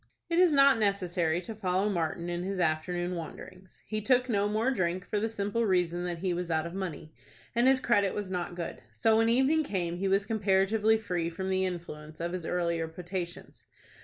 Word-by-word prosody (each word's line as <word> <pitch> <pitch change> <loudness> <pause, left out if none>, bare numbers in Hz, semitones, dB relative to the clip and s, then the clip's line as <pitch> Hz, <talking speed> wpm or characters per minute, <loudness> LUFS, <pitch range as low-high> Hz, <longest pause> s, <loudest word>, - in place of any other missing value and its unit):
It 335 - +3
is 360 -2 +6
not 275 -4 +6
necessary 180 -5 +1
to 205 +5 -7
follow 190 -1 0
Martin 170 -3 -2
in 175 0 -2
his 190 +1 -3
afternoon 175 +2 0
wanderings. 185 +2 -9
He 215 0 -3
took 250 +3 +3
no 205 -3 +1
more 220 +5 +1
drink, 185 -5 -1
for 210 - -1
the 225 +2 -1
simple 210 +1 -1
reason 175 -2 +1
that 175 -1 -2
he 180 +1 -1
was 175 0 -3
out 160 -1 0
of 170 - -6
money, 165 -5 -5 0.4
and 240 +2 +3
his 265 0 +5
credit 205 -6 +2
was 205 -2 -4
not 175 -1 -3
good; 170 -1 -5
so 220 -1 +3
when 225 0 +3
evening 265 +6 +3
came 175 - -2
he 195 +2 -1
was 195 +1 +2
comparatively 215 +1 +2
free 180 -6 -2
from 190 +3 -4
the 190 0 +2
influence 155 -3 -7
of 170 +1 -2
his 180 -3 -4
earlier 170 -2 0
potations. 175 +1 -6
185 Hz, 200 wpm, -29 LUFS, 175-215 Hz, 0.4 s, is